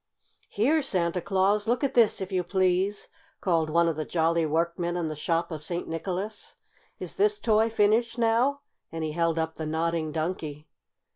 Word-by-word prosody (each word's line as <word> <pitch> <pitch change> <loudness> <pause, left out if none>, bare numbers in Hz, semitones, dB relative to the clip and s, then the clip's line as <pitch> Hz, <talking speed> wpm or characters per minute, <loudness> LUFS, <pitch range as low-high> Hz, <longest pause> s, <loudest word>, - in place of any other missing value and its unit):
"Here, 285 +10 +2
Santa 180 - +1
Claus, 200 +3 +1
look 245 +4 +1
at 275 - 0
this, 230 -4 +3
if 190 +1 -5
you 185 -1 0
please!" 185 +2 0 0.3
called 165 -4 +1
one 170 +2 +3
of 165 - 0
the 155 - -2
jolly 165 0 +1
workmen 170 +2 -1
in 165 -3 -2
the 155 - -4
shop 165 +3 -1
of 155 -2 -5
St. 170 +2 -3
Nicholas. 185 +6 -4 0.4
"Is - - -7
this 415 +1 +3
toy 220 - +2
finished, 225 +2 +2
now?" 240 +5 +2 0.3
and 165 -1 -4
he 155 - -2
held 165 0 0
up 160 0 -2
the 155 - -4
Nodding 160 0 -1
Donkey. 155 -2 -4
175 Hz, 175 wpm, -27 LUFS, 165-210 Hz, 0.4 s, this